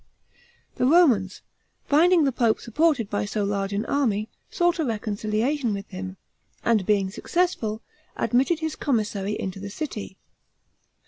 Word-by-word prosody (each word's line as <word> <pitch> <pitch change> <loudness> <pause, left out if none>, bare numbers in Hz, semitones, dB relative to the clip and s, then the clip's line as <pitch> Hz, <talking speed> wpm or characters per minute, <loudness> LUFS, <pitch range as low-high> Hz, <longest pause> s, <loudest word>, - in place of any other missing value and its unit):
The 250 - +2
Romans, 255 - +4 0.4
finding 335 +3 +4
the 275 - +2
pope 230 -3 +1
supported 270 -1 +1
by 205 - -1
so 205 0 -2
large 200 0 -1
an 200 +2 -1
army, 220 -7 0 0.2
sought 350 -1 +1
a - - +2
reconciliation 220 +2 -1
with 200 0 -7
him, 185 0 -7 0.5
and 220 -5 +2
being 200 -3 +2
successful, 225 - -1 0.3
admitted 270 +8 +1
his 315 -1 -2
commissary 210 -5 -1
into 190 0 -4
the 200 +1 -6
city. 210 -6 -6
220 Hz, 135 wpm, -25 LUFS, 200-290 Hz, 0.5 s, Romans